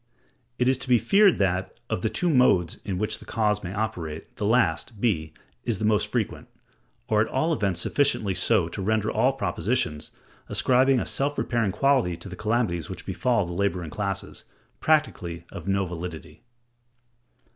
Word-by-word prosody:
It 125 - +1
is 130 0 +2
to 130 - -5
be 125 - +6
feared 195 - +4
that, 95 -1 -1
of - - -2
the 110 - 0
two 175 +7 0
modes 110 - +3
in 95 -3 -3
which 110 +2 -1
the - - -12
cause 105 -2 0
may 90 - -5
operate, 90 -7 -4
the 105 - -1
last 115 -1 +1
(b) 80 -9 0 0.3
is 115 -4 -1
the 110 - -2
most 105 -1 +2
frequent, - - -3 0.6
or 105 -1 +3
at 110 - +1
all 160 +5 0
events 100 - 0
sufficiently 135 -9 +1
so - - +2
to - - -6
render 110 +2 +1
all 130 +1 +2
propositions, 95 - -1 0.4
ascribing 130 +1 +3
a - - -2
self 145 +1 -1
repairing 115 -5 0
quality 130 -8 +2
to 85 +3 -9
the 90 - -7
calamities 105 -6 -1
which 95 -2 -8
befall 110 +2 +1
the 85 - -6
laboring 90 -4 -1
classes, 100 0 -4 0.4
practically 90 - 0
of - - -8
no 100 0 +1
validity. 85 -1 -7
105 Hz, 170 wpm, -25 LUFS, 90-125 Hz, 0.6 s, be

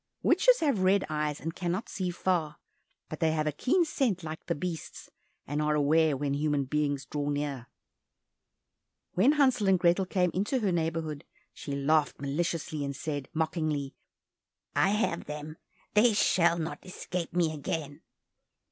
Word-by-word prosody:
Witches - - +4
have 280 -10 +2
red 190 +1 +3
eyes, 150 -1 -1
and 165 +1 -4
cannot 180 +5 -2
see 185 -4 -3
far, 170 -4 -1 0.5
but 155 - -7
they 160 -2 +2
have 155 -1 0
a 150 - +1
keen 335 - +2
scent 245 - 0
like 155 0 -6
the 170 - 0
beasts, 165 +1 -6 0.3
and 145 +2 -2
are 150 0 +1
aware 150 0 +3
when 140 0 -1
human 145 -1 +1
beings 145 0 -1
draw 145 0 -3
near. 145 -4 -3 1.5
When 245 +11 +4
Hansel 260 -8 +3
and 190 - +5
Grethel 175 +2 +2
came 180 -2 +1
into 205 +8 0
her 200 -3 +1
neighborhood, 160 -3 -2 0.3
she 140 - -6
laughed 150 +2 +1
maliciously, 155 +1 -2
and 140 0 -3
said 145 -3 -4
mockingly, 155 -3 -1 0.8
"I - - +4
have 210 -4 0
them, 150 +1 -7 0.4
they 220 +2 +5
shall 170 -4 +3
not 165 0 -4
escape 180 -2 -5
me 165 -3 +2
again!" 145 -1 -4
160 Hz, 155 wpm, -29 LUFS, 150-185 Hz, 1.5 s, and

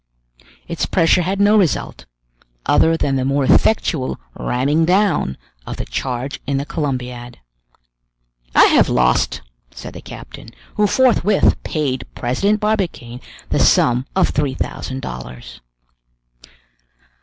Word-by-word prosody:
Its 170 -1 -2
pressure 180 0 +3
had 190 +3 -2
no 205 +1 +4
result, 190 -7 0 0.6
other 165 0 +3
than 135 -3 0
the 130 - -1
more 140 +1 +1
effectual 155 -3 +2
ramming 140 +6 0
down 180 - +1 0.3
of - - -5
the - - -4
charge 130 +2 -4
in 140 -1 0
the 140 - -2
Columbiad. 125 -6 -4 1.2
"I - - +8
have - - +4
lost," 60 0 +1 0.3
said - - -10
the - - -9
captain, - - -11 0.2
who 210 0 +2
forthwith 215 -5 +3
paid 140 -5 -3
President 195 - 0
Barbicane 185 - -2 0.3
the - - 0
sum 125 +2 +3
of 190 - +3
three 145 -3 -1
thousand 130 0 -5
dollars. 60 0 -9
145 Hz, 120 wpm, -19 LUFS, 125-185 Hz, 1.2 s, I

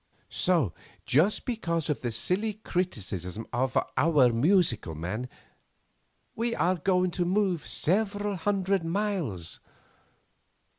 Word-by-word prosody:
"So 165 - +2 0.3
just 165 +11 +2
because 170 - -1
of 150 - -1
the 120 - -1
silly 185 - 0
criticism 110 - -3
of 130 +2 0 0.2
'Our 135 -4 +4
Musical 125 - +2
Man' 105 +11 -4 1.1
we 230 +1 -1
are 185 +1 +2
going 180 +1 +2
to 175 +1 -1
move 185 -2 0
several 205 +2 0
hundred 195 0 0
miles. 165 - -2
175 Hz, 105 wpm, -28 LUFS, 125-195 Hz, 1.1 s, Our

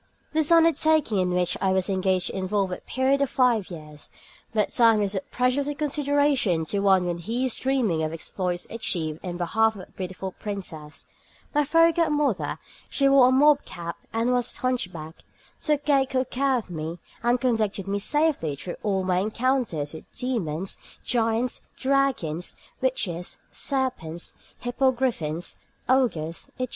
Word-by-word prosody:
This 315 0 +2
undertaking 315 - +4
in 180 -1 +1
which 180 0 +1
I 190 - +2
was 190 -1 +1
engaged 190 -2 +1
involved 190 0 -1
a - - -3
period 265 +2 +1
of 280 - +2
five 240 -6 +2
years, 150 -3 -10 0.4
but 215 -2 +1
time 230 -2 +5
is 200 -1 0
of 190 -1 -4
precious 255 +3 +1
little 290 - -2
consideration 285 - +2
to 200 - +1
one 190 -2 +4
when 175 -1 -2
he 230 +8 -1
is 255 - +2
dreaming 250 -11 +1
of 155 0 -1
exploits 175 +2 -3
achieved 165 -8 -1
in 175 -2 -5
behalf 220 +6 +2
of 190 - -9
a - - -28
beautiful 185 0 -5
princess. 170 -9 -5 0.5
My 295 - +3
fairy 330 +3 +5
godmother 300 - +1 0.3
(she 275 - +2
wore 275 -2 +7
a - - +2
mob 290 +2 +5
cap 170 0 -6 0.2
and 230 +2 +1
was 245 -1 0
hunchbacked) 180 -11 -3 0.4
took 300 -2 0
good 270 -3 +2
care 270 0 +2
of 215 -6 -6
me, 160 +1 -4 0.2
and 240 +1 +2
conducted 220 -6 0
me 200 +1 -1
safely 290 - +1
through 175 +5 -6
all 195 -3 0
my 180 -1 +1
encounters 220 - 0
with 160 - -11
demons, 195 - -2 0.2
giants, 230 +1 0 0.2
dragons, 265 - 0 0.3
witches, 180 -10 -1
serpents, 255 - -1 0.3
hippogriffins, 245 - 0 0.3
ogres, 190 -12 +1
etc. 255 -1 -1
220 Hz, 155 wpm, -25 LUFS, 180-265 Hz, 0.5 s, wore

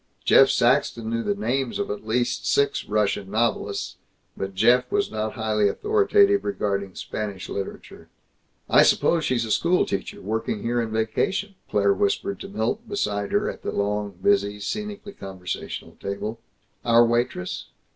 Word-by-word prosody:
Jeff 135 - +7
Saxton 120 -2 +2
knew 115 0 0
the 205 - -1
names 135 - -1
of 205 - -2
at 105 +1 -6
least 120 +2 0
six 140 0 +2
Russian 105 -2 0
novelists, 105 -2 -1 0.4
but 95 0 -5
Jeff 125 +5 +4
was 205 0 +1
not 110 0 -2
highly 110 -2 +1
authoritative 405 - +3
regarding 100 - -2
Spanish 100 -3 -5
literature. 100 -1 -7 0.6
"I - - +6
suppose 165 -3 +3
she's 120 -3 +1
a 110 - -4
school 175 +8 +3
teacher, 100 - -4
working 110 0 -3
here 120 +1 0
in 115 - -3
vacation," 110 - -1 0.2
Claire 100 -1 +3
whispered 100 -1 -1
to - - -7
Milt, 115 - -2
beside 105 - -1
her - - +1
at - - -5
the - - -3
long, 100 -1 -2
busy, 100 +1 +2
scenically 210 - -5
conversational 95 -2 -6
table. 105 +3 -4 0.4
"Our 120 0 +6
waitress? 120 -6 -1
110 Hz, 150 wpm, -24 LUFS, 100-135 Hz, 0.6 s, Jeff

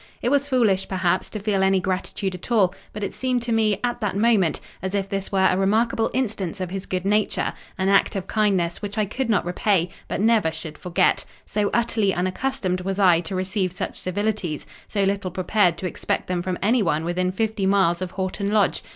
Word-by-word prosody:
It 240 - +2
was 285 +1 +2
foolish, 220 -8 +2
perhaps, 185 -1 0
to 215 - -5
feel 200 -1 0
any 190 0 +4
gratitude 185 +1 -2
at 180 +6 -9
all; 195 -6 +4 0.2
but 210 - -6
it 200 - -3
seemed 255 -2 -1
to 240 - -3
me, 215 -3 +2
at 240 -1 -1
that 205 -3 -1
moment, 205 -7 +3 0.2
as 190 +2 -3
if 195 -1 0
this 195 0 -4
were 190 -1 +3
a - - +2
remarkable 220 +4 +2
instance 205 -7 -2
of 185 -1 -4
his 195 0 -5
good 185 0 -2
nature: 210 +1 +1 0.2
an 190 +1 0
act 195 +1 +3
of 190 -2 -2
kindness, 190 -6 +1
which 205 0 -5
I 215 - +2
could 240 +5 -3
not 210 -5 +2
repay, 180 0 +1 0.2
but - - -3
never 215 -5 +3
should 160 -1 -7
forget: 180 +1 +2 0.2
so 205 -1 0
utterly 220 -4 +1
unaccustomed 185 0 -1
was 190 +1 -3
I 180 -4 +5
to 175 +3 -5
receive 185 0 -1
such 180 - -4
civilities, 195 -4 -2 0.2
so 200 -2 0
little 195 -1 0
prepared 185 -1 +2
to 185 - -5
expect - - -2
them 180 -1 -1
from 180 0 -2
anyone 190 -9 +2
within 180 +1 0
fifty 215 0 -1
miles 190 -3 +3
of 185 - -2
Horton 190 +2 -3
Lodge. 210 -3 +2
195 Hz, 205 wpm, -23 LUFS, 185-215 Hz, 0.2 s, I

